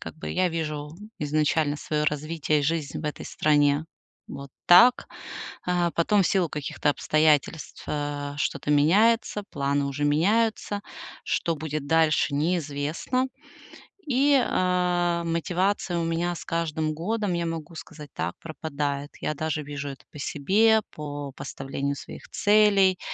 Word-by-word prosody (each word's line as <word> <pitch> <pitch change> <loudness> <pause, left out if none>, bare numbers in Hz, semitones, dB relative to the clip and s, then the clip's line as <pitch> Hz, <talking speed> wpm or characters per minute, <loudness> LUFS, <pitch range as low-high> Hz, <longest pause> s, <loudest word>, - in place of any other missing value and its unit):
Как - - -8
бы - - -6
я 185 0 +2
вижу 150 -3 -4 0.3
изначально 150 0 +1
своё 150 0 -2
развитие, 150 0 0
жизнь 150 -1 -1
в - - -9
этой 150 - -4
стране 145 0 +2 0.4
вот 140 0 -8 0.2
так, 240 +8 +7 0.6
а, 175 -1 +1
потом 200 +4 +3
в 180 - +1
силу 185 -4 +2
каких-то 150 0 -3
обстоятельств, 155 +1 +1
э, 145 -1 -3
что-то 140 0 -2
меняется, 205 +8 +3
планы 140 0 0
уже 140 +1 -2
меняются, 205 +7 +1 0.4
что 165 - 0
будет 155 -1 -4
дальше- 160 -2 +3
неизвестно. 160 - -1 0.8
И, 280 +1 +4
а, 180 -2 +1
мотивация 180 +2 0
у - - -1
меня 170 +1 -1
с - - -9
каждым 160 -2 -1
годом, 200 +4 -2
я 170 0 -1
могу 165 0 -5
сказать 150 -2 -10
так- - - -3
пропадает. 145 -3 -4
Я - - -2
даже 155 0 -2
вижу 145 0 -5
это 135 -2 -10
по 150 - -11
себе, 210 +11 +3
по 145 -2 -6
поставлению 140 +1 -4
своих - - -10
целей, 205 -3 +4
160 Hz, 135 wpm, -26 LUFS, 145-180 Hz, 0.8 s, так